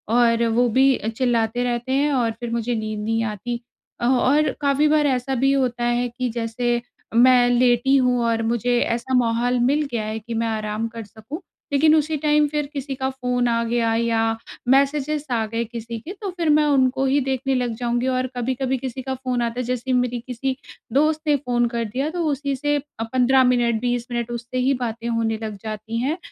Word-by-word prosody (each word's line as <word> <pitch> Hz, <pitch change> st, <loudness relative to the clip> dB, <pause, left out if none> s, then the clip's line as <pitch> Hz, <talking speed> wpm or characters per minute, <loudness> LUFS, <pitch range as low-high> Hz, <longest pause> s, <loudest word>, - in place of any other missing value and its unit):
और 235 Hz, -1 st, +3 dB
वो 240 Hz, +2 st, +2 dB
भी 265 Hz, +3 st, +4 dB
अ, -, -, -6 dB
चिल्लाते 230 Hz, 0 st, 0 dB
रहते 245 Hz, +1 st, -2 dB
हैं 285 Hz, +2 st, +2 dB
और 240 Hz, -4 st, +1 dB
फ़िर 240 Hz, -1 st, -4 dB
मुझे 235 Hz, +1 st, -1 dB
नींद 215 Hz, -1 st, -3 dB
नहीं 225 Hz, +1 st, 0 dB
आती। 230 Hz, +3 st, -4 dB, 0.4 s
अ, -, -, 0 dB
और 265 Hz, +4 st, +3 dB
काफ़ी 285 Hz, +1 st, +3 dB
बार 300 Hz, -1 st, +3 dB
ऐसा 265 Hz, 0 st, 0 dB
भी 270 Hz, +2 st, +2 dB
होता 245 Hz, -3 st, 0 dB
है 240 Hz, +1 st, +1 dB
कि 250 Hz, -1 st, -1 dB
जैसे 235 Hz, +1 st, -1 dB, 0.3 s
मैं 245 Hz, 0 st, +6 dB
लेटी 245 Hz, +2 st, +3 dB
हूँ 250 Hz, -2 st, +2 dB
और 230 Hz, -1 st, +1 dB
मुझे 240 Hz, +1 st, +1 dB
ऐसा 240 Hz, +3 st, -1 dB
माहौल 240 Hz, +1 st, +1 dB
मिल 285 Hz, +4 st, +2 dB
गया 230 Hz, -3 st, -1 dB
है 215 Hz, +1 st, -3 dB
कि 230 Hz, +2 st, -7 dB
मैं 230 Hz, 0 st, 0 dB
आराम 215 Hz, 0 st, -2 dB
कर 230 Hz, 0 st, -8 dB
सकूँ, 225 Hz, -, -9 dB, 0.3 s
लेकिन 310 Hz, +2 st, +5 dB
उसी 310 Hz, 0 st, +1 dB
टाइम 300 Hz, 0 st, +3 dB
फिर 295 Hz, 0 st, -2 dB
किसी 275 Hz, -1 st, -4 dB
का 265 Hz, 0 st, -2 dB
फ़ोन 250 Hz, -2 st, -1 dB
आ 230 Hz, 0 st, +1 dB
गया 230 Hz, -1 st, +1 dB
या 230 Hz, -1 st, +1 dB, 0.5 s
मैसेजेज़ 280 Hz, +2 st, +2 dB
आ 225 Hz, -1 st, +1 dB
गए 230 Hz, +2 st, -2 dB
किसी 230 Hz, 0 st, -6 dB
के, 330 Hz, -, -8 dB
तो 400 Hz, -1 st, -6 dB
फिर 330 Hz, -3 st, 0 dB
मैं 300 Hz, 0 st, +4 dB
उनको 270 Hz, -2 st, +2 dB
ही 275 Hz, +2 st, +3 dB
देखने 265 Hz, 0 st, -1 dB
लग 245 Hz, -2 st, -1 dB
जाऊँगी 240 Hz, +1 st, -1 dB
और 255 Hz, 0 st, 0 dB
कभी-कभी 260 Hz, +2 st, -1 dB
किसी 260 Hz, 0 st, -5 dB
का 265 Hz, +1 st, -3 dB
फ़ोन 255 Hz, -1 st, -2 dB
आता 235 Hz, +1 st, -2 dB
है। -, -, -1 dB
जैसे 250 Hz, +1 st, -2 dB
मेरी 245 Hz, -1 st, +1 dB
किसी 260 Hz, +2 st, -2 dB, 0.4 s
दोस्त 305 Hz, +2 st, +2 dB
ने 295 Hz, -, +4 dB
फ़ोन 245 Hz, -3 st, 0 dB
कर 235 Hz, -, 0 dB
दिया, 265 Hz, +8 st, -2 dB
तो 345 Hz, 0 st, -2 dB
उसी 280 Hz, -1 st, -1 dB
से 290 Hz, +2 st, 0 dB
अ, 285 Hz, -5 st, -7 dB
15 260 Hz, +1 st, +4 dB
मिनट, 240 Hz, -3 st, +2 dB
20 245 Hz, -1 st, -1 dB
मिनट 240 Hz, 0 st, -2 dB
उससे 240 Hz, +1 st, -5 dB
ही 260 Hz, +2 st, +2 dB
बातें 230 Hz, 0 st, -4 dB
होने 230 Hz, -1 st, 0 dB
लग 215 Hz, -2 st, -5 dB
जाती 215 Hz, +1 st, -5 dB
हैं। 300 Hz, +7 st, -1 dB
245 Hz, 205 wpm, -22 LUFS, 230-270 Hz, 0.5 s, मैं